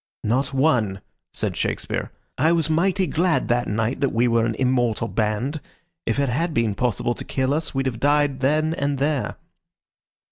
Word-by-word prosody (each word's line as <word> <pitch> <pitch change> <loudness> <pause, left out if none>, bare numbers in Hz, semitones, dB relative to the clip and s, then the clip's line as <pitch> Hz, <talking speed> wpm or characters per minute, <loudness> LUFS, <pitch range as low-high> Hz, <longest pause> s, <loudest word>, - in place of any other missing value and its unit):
"Not 130 +5 +1
one," 125 -9 +2 0.3
said - - -2
Shakespeare. - - -2 0.2
"I 160 +5 +3
was 165 -2 +1
mighty 185 +4 +2
glad 170 +3 +1
that 120 0 +1
night 115 +4 -1
that 140 - +3
we 120 +2 +2
were 115 -1 +2
an 115 - -2
immortal 120 -3 +1
band. 115 +8 -1 0.5
If 115 - 0
it 140 -2 +1
had 165 +6 -1
been 115 -3 +2
possible 120 +1 0
to - - -7
kill 130 +1 0
us 155 -1 -2
we'd 135 0 0
have 120 -4 -2
died 145 0 +2
then 155 +4 +2
and 140 -2 -1
there." 145 0 0
130 Hz, 175 wpm, -23 LUFS, 115-150 Hz, 0.5 s, I